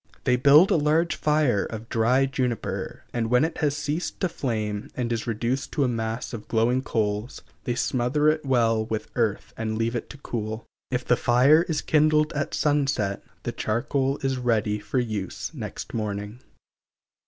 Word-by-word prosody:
They 125 - +3
build 145 +8 +6
a - - +4
large 155 +3 +2
fire 150 -9 +2
of 110 0 -7
dry 120 +4 +3
juniper, 125 -4 -3
and 115 -2 -1
when 125 +5 +4
it 160 - -4
has 145 -1 +1
ceased 150 +3 -3
to 185 - +1
flame 110 -8 -3
and 120 -2 -1
is 115 0 -3
reduced 120 +4 -1
to 145 - +2
a - - +2
mass 115 +1 -3
of 110 -2 -7
glowing 120 +3 +2
coals, 110 -1 -2 0.2
they 120 -3 -1
smother 130 +4 +1
it 155 0 +2
well 115 -5 +2
with 110 -1 -4
earth 115 -4 -1
and 110 -1 -3
leave 115 +1 0
it 120 - -4
to - - -10
cool. 110 -4 -4 0.2
If 125 -1 -2
the 125 - +4
fire 125 +7 +5
is 155 -3 -1
kindled 155 0 +3
at 145 -1 -2
sunset, 140 -9 0 0.2
the - - -2
charcoal 135 +5 -1
is 135 -1 0
ready 110 -4 +1
for 105 +4 -4
use 110 -6 -3
next - - -7
morning. 105 +1 -4
125 Hz, 175 wpm, -25 LUFS, 110-140 Hz, 0.2 s, build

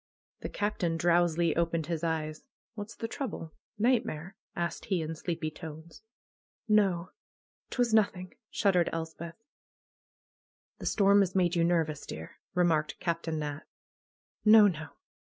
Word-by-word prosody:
The - - -5
Captain 195 -5 -1
drowsily 170 -1 +3
opened 165 -1 0
his 170 0 -3
eyes. 155 +4 -2 0.3
What's 215 0 -7
the 225 - -4
trouble? 225 - -5 0.2
Nightmare?" 215 -7 0 0.2
asked 170 -1 -3
he 190 -3 0
in 160 0 -3
sleepy 160 -1 -3
tones. 160 +1 -10 0.7
''No! 195 -4 +3 0.6
'Twas 245 -3 +1
nothing!" 190 -4 +2 0.2
shuddered 180 -4 +2
Elspeth. 165 0 -5 1.4
"The - - -4
storm 200 -1 +5
has 190 -2 +2
made 180 -2 +3
you 170 - +3
nervous, 165 -4 0
dear," 80 +1 -8 0.2
remarked 165 -4 +2
Captain 165 -2 -2
Nat. 150 -1 -3 0.8
"No, 215 0 +8
no! 155 -5 -3
170 Hz, 125 wpm, -30 LUFS, 160-200 Hz, 1.4 s, No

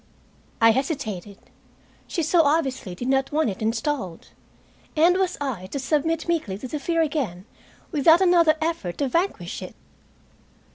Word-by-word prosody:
I 225 0 +7
hesitated. 220 - -3 0.7
She 335 - -2
so 330 +2 +4
obviously 275 - 0
did 245 +7 -5
not 270 0 +1
want 300 -7 +1
it 190 - -9
installed. 225 - -2 0.7
And 335 +3 +5
was 370 -1 0
I 245 -10 -4
to 205 - -5
submit 305 +4 0
meekly 310 - -1
to 255 - -7
the 300 +4 -4
fear 330 +3 +1
again, 250 - -3 0.5
without 320 +3 +5
another 345 -4 +5
effort 320 - -2
to 280 - 0
vanquish 340 +9 -2
it? - - -8
285 Hz, 145 wpm, -24 LUFS, 225-325 Hz, 0.7 s, I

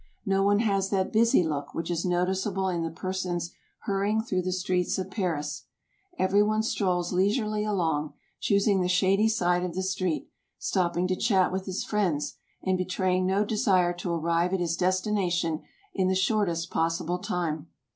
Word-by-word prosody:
No 195 0 +2
one 205 +2 +3
has 195 -3 +1
that 190 -2 0
busy 225 -4 +4
look 145 -3 -3
which 165 +1 -3
is 170 0 -1
noticeable 190 +2 0
in 175 -2 -1
the 165 - -2
persons 180 0 -3 0.3
hurrying 205 +2 0
through 185 -5 -1
the 185 +1 -2
streets 180 -1 0
of 190 0 -4
Paris. 160 -7 -2 0.5
Every 195 +2 +3
one 215 +1 +2
strolls 185 -5 0
leisurely 210 +3 +1
along, 165 -8 0 0.3
choosing 200 -1 +2
the 180 - +1
shady 190 +4 +3
side 180 -4 +1
of 175 -2 -4
the 190 - -1
street, 185 -3 -1 0.3
stopping 180 -1 0
to 185 - 0
chat 190 -2 +2
with 190 +1 -3
his 185 0 -2
friends, 180 -9 0 0.3
and 185 -1 +1
betraying 185 0 0
no 195 +2 +2
desire 195 -5 +2
to 175 0 -3
arrive 170 +2 +1
at - - -1
his 170 -1 0
destination 180 -3 0 0.3
in 190 -2 +1
the 190 - +2
shortest 190 -4 0
possible 165 +2 0
time. 170 -4 -2
185 Hz, 165 wpm, -27 LUFS, 175-195 Hz, 0.5 s, busy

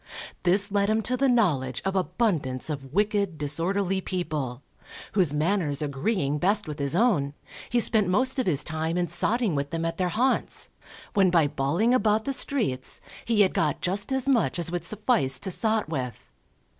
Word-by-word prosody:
This 195 +3 +4
led 200 0 +1
him 220 0 +1
to 255 - +1
the 270 +1 +2
knowledge 150 - +1
of 195 0 -1
abundance 170 - 0
of 135 -3 -6
wicked, 200 -2 0
disorderly 180 +6 0
people, 150 -9 -4 0.5
whose 185 -7 +2
manners 150 -1 0
agreeing 145 +1 -1
best 200 +4 +1
with 150 0 -6
his 140 +2 -1
own, 175 - +2 0.3
he 240 - +2
spent 215 -3 +2
most 255 +9 +1
of 255 - 0
his 150 -5 +1
time 160 +1 -2
in 175 -1 0
sotting 215 +4 0
with 140 0 -2
them 165 +1 -3
at 165 0 -3
their 180 -1 +1
haunts, 250 +9 0 0.4
when 195 -4 +4
by 170 -3 +4
bawling 150 - +1
about 220 -3 +2
the 275 - -1
streets, 215 - 0 0.3
he 230 -3 +2
had 190 - +3
got 150 -3 0
just 200 +6 -1
as 265 0 0
much 245 -8 +2
as 170 -1 -1
would 175 -1 -3
suffice 210 - +1
to 190 - -4
sot 220 +3 +1
with. 130 -7 -5
180 Hz, 180 wpm, -26 LUFS, 150-215 Hz, 0.5 s, This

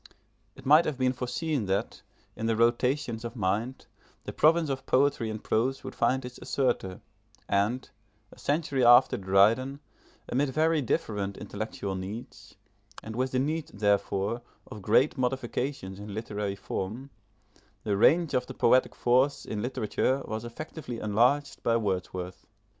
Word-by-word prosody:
It 135 - -14
might 155 +5 +6
have 150 -4 -2
been 130 0 +1
foreseen 125 - -2
that, 100 +3 -2 0.3
in 110 +1 -3
the 115 - +2
rotations 120 +1 +1
of 120 +1 -6
mind, 110 +5 -2 0.4
the - - -6
province 160 +1 +4
of 135 0 -5
poetry 135 -4 +2
in 110 - -3
prose 120 +5 -1
would - - -7
find 130 +2 +1
its 125 0 -9
assertor; 95 -9 -1 0.5
and, 105 +6 0 0.4
a - - -16
century 145 -3 0
after 120 0 +7
Dryden, 105 +8 +3 0.5
amid 135 +3 0
very 155 +2 +2
different 100 -5 -2
intellectual 100 -1 -5
needs, 95 +5 -8 0.5
and 110 0 -7
with 130 +2 0
the 130 - 0
need 150 +4 -1
therefore 100 +2 0 0.2
of 105 - -10
great 130 +8 +3
modifications 125 -5 -2
in 105 -1 -7
literary 105 -2 -3
form, 105 +7 -5 0.7
the 105 -2 0
range 160 - +4
of 125 0 0
the - - -8
poetic 125 +2 +3
force 130 +4 +2
in 105 - -4
literature 130 +2 -1
was 110 +1 -4
effectively 125 +1 -7
enlarged 120 +8 +1
by 115 0 +2
Wordsworth. 95 -3 -4
120 Hz, 145 wpm, -28 LUFS, 105-135 Hz, 0.7 s, after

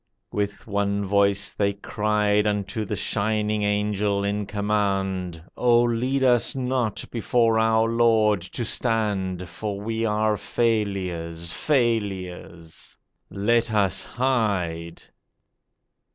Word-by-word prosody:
With 105 0 -3
one 100 -1 -1
voice 100 0 +2
they 100 -1 0
cried 105 0 0
Unto 105 +1 -2
the 105 - -3
shining 105 +1 0
Angel 105 -1 0
in 100 0 -2
command: 95 -4 -1 0.2
'Oh, 120 -1 +4
lead 125 +3 0
us 125 -1 +3
not 125 -4 -1
before 115 -1 +2
our 110 0 +3
Lord 115 -3 +3
to 95 +6 -5
stand, 100 -6 -1
For 100 +4 -5
we 110 +2 -3
are 110 -1 +1
failures, 90 -8 -2
failures! 95 - -2 0.3
Let 115 +4 +1
us 100 -3 +2
hide. 100 -10 -1
105 Hz, 105 wpm, -24 LUFS, 100-115 Hz, 0.3 s, Oh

